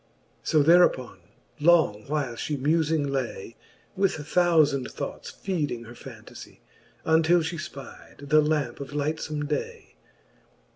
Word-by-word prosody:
XVII. -, -, -7 dB
So 155 Hz, -2 st, +4 dB
thereuppon 165 Hz, -6 st, +4 dB, 0.4 s
long 150 Hz, -10 st, +3 dB
while 145 Hz, -4 st, -2 dB
Ihe 145 Hz, +5 st, -3 dB
mufing 155 Hz, 0 st, +1 dB
lay. 120 Hz, -4 st, -4 dB, 0.4 s
With 195 Hz, 0 st, +2 dB
thoufand 155 Hz, -4 st, +2 dB
thoughts -, -, -6 dB
feeding 150 Hz, -11 st, -3 dB
her 120 Hz, +1 st, -11 dB
fantafie, -, -, -12 dB, 0.4 s
Untill 160 Hz, +2 st, +4 dB
Ihe 165 Hz, +1 st, -4 dB
fpide 140 Hz, +1 st, -12 dB
the 155 Hz, 0 st, +6 dB
lampe 150 Hz, -5 st, -1 dB
of 140 Hz, 0 st, -8 dB
lightfome 150 Hz, 0 st, -2 dB
day. 150 Hz, -1 st, -5 dB
150 Hz, 125 wpm, -26 LUFS, 140-160 Hz, 0.4 s, the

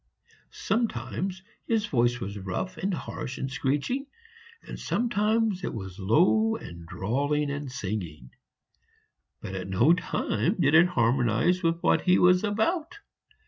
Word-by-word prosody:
Sometimes 190 Hz, -, -2 dB, 0.2 s
his 225 Hz, -2 st, +1 dB
voice 120 Hz, -8 st, +1 dB
was 100 Hz, -2 st, -5 dB
rough 95 Hz, -, -4 dB
and 195 Hz, +2 st, -1 dB
harsh 150 Hz, -6 st, -5 dB
and 135 Hz, -, -4 dB
screeching, 145 Hz, -, -1 dB, 0.6 s
and -, -, -8 dB
sometimes 220 Hz, -3 st, 0 dB
it -, -, -3 dB
was 95 Hz, -3 st, -7 dB
low 185 Hz, -, +3 dB
and 85 Hz, -, -9 dB
drawling 145 Hz, -, -1 dB
and 140 Hz, -2 st, -5 dB
singing; 90 Hz, -, -5 dB, 1.1 s
but -, -, -6 dB
at 95 Hz, -1 st, -5 dB
no 95 Hz, -, +4 dB
time 180 Hz, +1 st, -1 dB
did 145 Hz, -3 st, +3 dB
it 170 Hz, +3 st, +7 dB
harmonize 125 Hz, +4 st, +2 dB
with 165 Hz, -2 st, +2 dB
what -, -, +3 dB
he 180 Hz, 0 st, +4 dB
was 180 Hz, +1 st, +5 dB
about. 305 Hz, -, -1 dB
150 Hz, 135 wpm, -27 LUFS, -, 1.1 s, it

